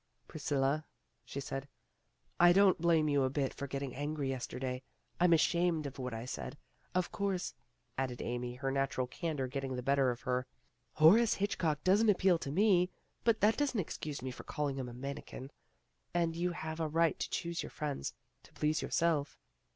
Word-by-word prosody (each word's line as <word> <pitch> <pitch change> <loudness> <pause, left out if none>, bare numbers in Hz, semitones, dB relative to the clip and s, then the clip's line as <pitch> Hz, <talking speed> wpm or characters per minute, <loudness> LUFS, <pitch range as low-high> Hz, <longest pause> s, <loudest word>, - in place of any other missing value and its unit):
"Priscilla," 145 -1 0 0.4
she 140 - -6
said, 135 0 -4 0.7
"I 175 0 +8
don't 195 -3 +5
blame 165 -3 +4
you 145 -1 +3
a 130 - +2
bit 135 0 -1
for 140 - -5
getting 135 -1 -4
angry 145 0 -2
yesterday. 130 0 -3 0.4
I 175 - +5
'm 175 - +6
ashamed 170 -1 +2
of 140 -1 -6
what 125 -1 -3
I 115 +1 -5
said. 70 - -5 0.4
Of 185 -1 +1
course, 195 -3 -1 0.2
' 120 - -45
' 120 -2 -42
added 125 -2 -2
Amy, 120 0 -3
her 135 +1 -2
natural 135 -1 0
candor 150 +1 -3
getting 135 0 -3
the 125 - -4
better 135 0 +3
of 120 +1 -3
her, 125 0 -1 0.5
"Horace 210 +9 +6
Hitchcock 170 -7 0
doesn't 205 +4 +4
appeal 185 -3 +4
to 140 - -4
me, 185 0 +4 0.3
but 230 -2 +3
that 215 +2 +4
doesn't 280 -6 +1
excuse 150 -5 -4
me 130 - -3
for - - -9
calling 145 -2 -2
him 130 -2 -3
a - - -9
manikin, 135 0 -6 0.6
and 165 -1 +1
you 175 +1 0
have 160 -1 -5
a 160 - 0
right 165 +2 +2
to - - -2
choose 170 0 -2
your - - -6
friends 145 - -4 0.3
to - - -19
please 155 +1 0
yourself." 160 -4 0
150 Hz, 190 wpm, -33 LUFS, 135-170 Hz, 0.7 s, I